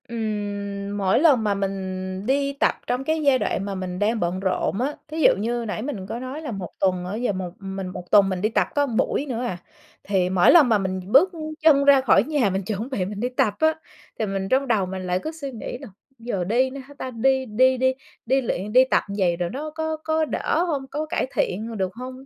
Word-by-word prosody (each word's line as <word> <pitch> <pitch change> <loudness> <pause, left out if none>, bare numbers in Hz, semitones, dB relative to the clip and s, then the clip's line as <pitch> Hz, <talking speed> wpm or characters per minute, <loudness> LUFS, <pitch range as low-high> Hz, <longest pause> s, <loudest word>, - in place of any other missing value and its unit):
Ừm, 205 -3 -4
mỗi 195 +1 +2
lần 280 -7 +5
mà 210 -1 +1
mình 195 -1 -1 0.5
đi 280 +2 +1
tập - - +3
trong 250 +2 -1
cái 315 +3 0
giai 275 -3 +4
đoạn 195 - -1
mà 200 -1 -4
mình 185 -1 -5
đang 220 +2 +1
bận 175 0 -1
rộn 190 +1 -1
á, 285 +3 -1
thí 310 +1 -5
dụ - - +6
như 235 +3 -2
nãy 215 0 -3
mình 220 -7 -5
có 230 - -4
nói 260 +4 -6
là 300 - -5
1 195 -5 -5
tuần 185 -2 +1
á, 185 +3 -4
giờ 240 0 0
một 185 -1 -4
mình 195 -1 -5
1 180 -1 -8
tuần 200 -2 +6
mình 185 -2 -2
đi 215 - +2
tập 225 - +1
có 290 -1 +3
buổi 265 +3 0
nữa 245 -4 -3
à, 210 -8 -3 0.5
thì 190 -3 +1
mỗi 185 -1 +5
lần 310 -7 +7
mà 220 - +4
mình 190 -1 -2
bước 315 +10 +6 0.3
chân 300 -3 +5
ra 280 -1 +7
khỏi 205 -6 +4
nhà 285 -6 +1
mình 190 +1 -2
chuẩn 215 +5 -4
bị 205 -9 -1
mình 200 +1 -6
đi 245 +3 -1
tập 230 -4 +1
á, 315 0 +4 0.5
thì 220 - +1
mình 195 -1 -3
trong 270 +1 +2
đầu 215 -6 +2
mình 185 0 -5
lại 180 0 0
cứ 315 - -3
suy 295 -4 -7
nghĩ 240 0 -6
là - - -10 0.3
"Giờ 215 -6 -2
đi 240 +8 +2
nữa 275 +1 -8
hả 285 - -13
ta? 260 - -5
Đi 265 +3 +1
đi 255 +3 +3
đi 260 +1 +2 0.3
đi 265 +3 +2
luyện, 210 -4 -3
đi 255 +1 +8
tập - - +3
như 200 - -4
vậy 175 -3 +2
rồi 175 -1 -2
nó 295 - -5
có 315 0 -2
có 315 0 +1
đỡ 320 +2 0
hông, 280 -5 -2
có 300 +2 -2
cải 310 -4 -1
thiện 210 +5 -1
h 230 - -6
được 190 -2 -2
hông?" 255 +2 -8
225 Hz, 250 wpm, -23 LUFS, 195-270 Hz, 0.5 s, đi